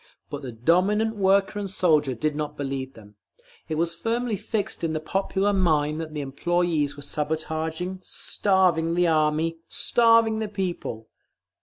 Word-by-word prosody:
But 145 - -5
the 130 -3 -6
dominant 185 - +2
worker 195 +1 +2
and 200 -1 -3
soldier 155 -8 +2
did 150 +5 -1
not 150 0 -4
believe 135 -1 -4
them; 105 -2 -16 0.5
it 155 - -1
was 170 +2 0
firmly 230 +6 -1
fixed 210 -1 -3
in 160 -1 0
the 155 - -1
popular 195 +4 0
mind 155 -4 +1
that 160 -1 -6
the 150 - -2
employees 155 +1 0
were 145 - -8
sabotaging, 160 +4 -3
starving 180 -4 +1
the 175 0 +3
Army, 160 0 +1
starving 230 0 +3
the 220 - -2
people…. 180 - -4
165 Hz, 150 wpm, -25 LUFS, 150-195 Hz, 0.5 s, the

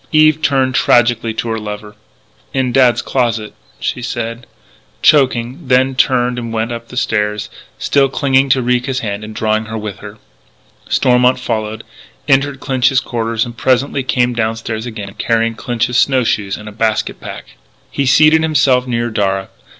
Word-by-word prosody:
Eve 155 0 +4
turned 135 -3 +1
tragically 120 -2 +3
to 110 +1 -4
her 115 0 -2
lover: 105 0 -7 0.6
"In 130 -2 +1
Dad's 125 -2 +3
closet 115 -4 -1 0.2
" - - -32
she 125 - -3
said, 120 0 -5 0.6
choking; 130 0 +2
then 130 +1 +3
turned 125 -1 +1
and 115 -1 -5
went 115 +1 -2
up 115 0 -6
the 125 - -10
stairs, 105 -3 -1 0.3
still 140 -1 +2
clinging 135 0 +2
to 130 -1 +3
Ricca's 125 +1 0
hand 105 -1 -4
and 110 0 -9
drawing 110 0 0
her 110 +1 -5
with 105 -2 -6
her. 105 +1 -10 0.7
Stormont 125 0 +3
followed, 110 -3 -3 0.4
entered 140 0 +2
Clinch's 130 -1 +2
quarters, 115 -3 -2
and 120 -1 -9
presently 130 +3 +1
came 125 -1 +1
downstairs 115 0 -3
again, 105 -4 -7
carrying 115 0 +1
Clinch's 120 +2 -1
snow 130 -2 +3
shoes 100 -3 -1
and 105 - -11
a - - -7
basket 110 0 -1
pack. - - -9 0.4
He 140 - -1
seated 155 +4 +5
himself 135 -5 +2
near 120 -1 -1
Darragh. 95 -2 -1
120 Hz, 160 wpm, -16 LUFS, 110-130 Hz, 0.7 s, seated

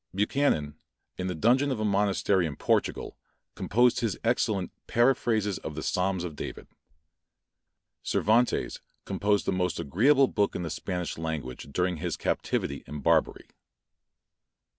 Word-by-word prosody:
Buchanan, 100 - +1 0.4
in 90 - -2
the 90 - -2
dungeon 125 - +3
of 130 -5 -2
a 110 - 0
monastery 100 -3 +2
in 75 - -6
Portugal, - - 0 0.4
composed 120 +4 +2
his 115 -5 -1
excellent 110 -5 0 0.2
Paraphrases 115 -5 +2
of 75 - -7
the 75 - -5
Psalms 90 -1 0
of 85 -4 -5
David. - - -7 1.4
Cervantes 115 +3 +1 0.2
composed 105 0 +1
the - - +1
most 90 -1 -1
agreeable 130 - +4
book 105 -4 0
in 90 - -3
the 80 - -4
Spanish 90 -3 -4
language 75 -6 -4
during 90 +3 0
his 85 +1 -3
captivity 70 - -2
in 75 -1 -6
Barbary. - - +1
95 Hz, 135 wpm, -28 LUFS, 80-115 Hz, 1.4 s, agreeable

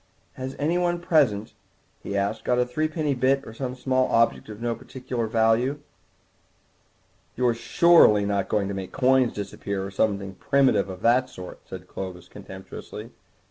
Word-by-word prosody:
"Has 130 +1 -6
anyone 175 +3 0
present," 145 - +1 0.5
he 100 - -3
asked, 100 +3 -1
"got 125 - +1
a 125 - +3
three 155 +6 -1
penny 155 -2 -1
bit 135 +2 +1
or 110 - -9
some 125 +1 -4
small 130 0 +1
object 115 -1 +2
of 105 -1 -8
no 120 0 -1
particular 125 0 -5
value—?" 115 +5 +2 1.6
"You're 125 -1 +2
surely 115 -5 +5
not 100 -1 -1
going 100 -2 +1
to 100 - -3
make 95 -1 -6
coins 130 -1 +3
disappear, 100 -1 -4
or 100 - -7
something 100 -1 -1
primitive 125 -2 +2
of 95 -1 -8
that 125 +2 +3
sort?" 90 -7 -10
said 90 -1 -8
Clovis 90 -2 -7
contemptuously. 95 0 -10
115 Hz, 155 wpm, -25 LUFS, 100-130 Hz, 1.6 s, surely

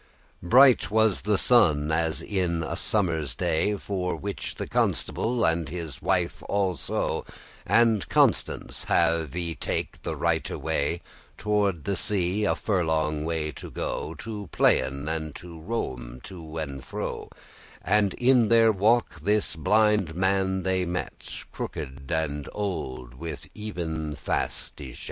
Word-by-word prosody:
Bright 125 +8 +6
was 110 -2 +3
the 105 -1 +1
sun, 80 -11 +4
as 80 0 0
in 90 -4 -1
a - - -3
summer's 80 - +1
day, 90 +4 +1
For 90 -2 -2
which 100 0 -5
the - - -4
Constable, 120 +1 +1
and 80 -2 +1
his 80 -5 -6
wife 90 -3 0
also, 95 -4 -1 0.4
And 115 -3 +3
Constance, - - +1
have 80 -3 +2
y 85 -2 -2
take - - -3
the - - -3
righte - - -1
way 80 +1 -1 0.3
Toward 100 -5 0
the 100 - -1
sea 100 +1 +1
a - - +2
furlong 80 -6 0
way 80 -2 -1
or - - -5
two, - - -9 0.5
To 105 -5 -6
playen, 70 +2 +2
and 80 -2 -3
to 85 -2 -9
roame 65 - -4
to 80 -4 -9
and 70 -4 -4
fro; - - -5 0.5
And 105 -2 +2
in 125 -2 +4
their 115 -1 +6
walk 110 -2 +2
this 105 +2 +1
blinde 105 0 +2
man 95 0 +1
they 95 0 +1
met, 90 0 -4 0.2
Crooked 70 -1 -6
and 75 -3 -1
old, 65 -12 -4
with 75 0 -7
eyen 80 -8 -4
fast 70 - -2
y 65 -4 -8
shet. - - -11
85 Hz, 140 wpm, -26 LUFS, 80-105 Hz, 0.5 s, Bright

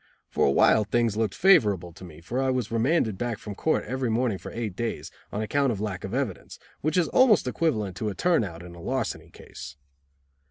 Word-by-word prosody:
For - - +2
a - - +3
while 105 +9 +5
things 115 0 +1
looked 110 -3 -1
favorable 100 - +4
to 90 - -13
me, 80 -3 -11
for 120 +10 -2
I 135 - +1
was 125 -4 -1
remanded 115 - +1
back 120 -2 -2
from 105 - -7
court 155 +10 0
every 130 +2 -2
morning 115 -3 0
for - - -8
eight 110 -5 -4
days, 115 +2 -4 0.2
on 105 - -2
account 140 +4 +1
of 105 - -3
lack 100 -3 -4
of 95 - -5
evidence, 125 -6 -3 0.2
which 155 +4 -1
is 175 -3 +3
almost 230 - +4
equivalent 110 - -1
to 110 +3 -2
a 100 - -5
turn 170 - +2
out 85 -4 -7
in 90 0 -10
a 85 - -11
larceny 130 +4 -3
case. 70 - -11
110 Hz, 215 wpm, -26 LUFS, 95-130 Hz, 0.2 s, while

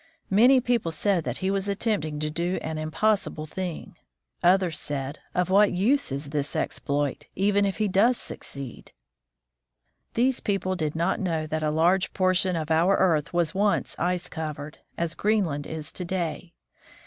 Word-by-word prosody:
Many 245 +7 +6
people 240 -8 0
said 175 +1 0
that 125 0 -2
he 190 - +2
was 195 0 -1
attempting 200 -7 -1
to 155 0 -1
do 175 +4 -1
an 160 0 -3
impossible 155 0 0
thing. 180 +1 -6 0.4
Others 180 -3 +3
said, 140 0 -4
" - - -36
Of 180 +1 +1
what 200 +1 +5
use 225 - +2
is 140 +1 -4
this 145 -1 -2
exploit, 145 -1 -2
even 200 +1 +2
if 195 - -1
he 215 -1 +1
does 215 +6 +3
succeed? 135 -4 -7 0.6
" - - -51
These 250 +2 +2
people 195 -2 -1
did 155 -4 -2
not 170 +4 0
know 165 -5 -1
that 155 0 -2
a 155 - +1
large 175 +5 +2
por 185 -1 +2
tion 185 0 +2
of 160 -1 -3
our 170 +5 +4
earth 165 -6 +2
was 175 -3 +1
once 205 +1 +1
ice 180 +1 0
covered, 155 -2 -6 0.2
as 170 -1 -1
Greenland 185 -10 0
is 160 -1 -4
to 180 - -6
day. 175 -1 -3
175 Hz, 170 wpm, -26 LUFS, 155-195 Hz, 0.6 s, Many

